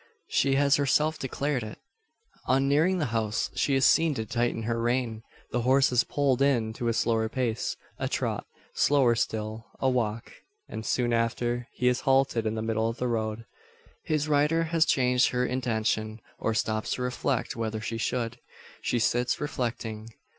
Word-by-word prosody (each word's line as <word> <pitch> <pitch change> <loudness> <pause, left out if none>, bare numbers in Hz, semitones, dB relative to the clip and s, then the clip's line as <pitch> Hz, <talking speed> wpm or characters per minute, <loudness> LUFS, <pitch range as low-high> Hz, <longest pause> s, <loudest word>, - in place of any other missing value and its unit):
She 135 0 +2
has 140 0 +4
herself 150 +3 +2
declared 135 0 -2
it. 110 -1 -7 0.7
On 135 +1 +3
nearing 160 +7 +3
the 160 - 0
house, 110 -1 -1
she 140 - +1
is 135 - +3
seen 165 -3 +4
to 110 -2 -3
tighten 120 +1 -1
her 115 +1 -1
rein. 120 -2 -1 0.3
The 120 - 0
horse 130 +3 +4
is 120 -1 +4
pulled 140 -3 0
in 120 -6 +2
to 120 +1 -3
a 115 - +2
slower 115 0 +1
pace 120 -2 -2 0.2
a - - -1
trot; - - -2 0.3
slower 135 -5 +4
still 110 0 -3
a 135 - +1
walk; 115 -3 -2 0.4
and, 110 - -6
soon 120 +1 0
after, 120 +1 0
he 125 - 0
is 125 0 +3
halted 135 -4 +2
in 110 - -1
the 110 - -3
middle 110 0 0
of 115 - -5
the 125 - -1
road. 110 -1 -2 0.6
His 155 -1 0
rider 150 +3 +2
has 165 -1 +2
changed 125 -1 +3
her 125 0 0
intention; 110 -3 -1 0.2
or 110 - -1
stops 110 0 -1
to 125 - -3
reflect 125 0 -1
whether 110 -1 -3
she 115 +1 -4
should. 120 0 -2 0.4
She 125 - 0
sits 120 +2 +1
reflecting. 115 -6 -4
120 Hz, 175 wpm, -27 LUFS, 115-135 Hz, 0.7 s, has